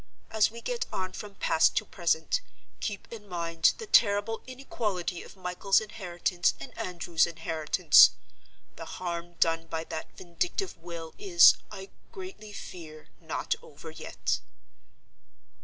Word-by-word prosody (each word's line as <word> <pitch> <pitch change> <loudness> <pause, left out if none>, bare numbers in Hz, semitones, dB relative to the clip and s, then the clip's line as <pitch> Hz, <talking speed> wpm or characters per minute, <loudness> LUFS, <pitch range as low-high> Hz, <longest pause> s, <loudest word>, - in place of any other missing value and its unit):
As 220 -1 +4
we 230 +1 -10
get 485 - -2
on 185 -1 -3
from 205 0 -8
past 160 - +3
to - - +1
present, 175 - 0 0.4
keep 205 -3 -4
in 210 -3 -10
mind 165 -2 +2
the 455 - -7
terrible 220 - +3
inequality 210 -9 -3
of - - -13
Michael's 180 +2 +2
inheritance 180 -4 -1
and - - -9
Andrew's 170 -2 0
inheritance. 160 -2 +5 0.7
The - - -7
harm 175 -1 -4
done 165 -1 +1
by 160 0 -3
that 160 -1 -7
vindictive 345 - -3
will 165 -1 -8
is, 175 -4 +8 0.2
I 195 -1 -9 0.2
greatly 370 - -9
fear, 165 -7 -10
not - - -2
over - - -11
yet. - - -2
180 Hz, 130 wpm, -29 LUFS, 170-210 Hz, 0.7 s, is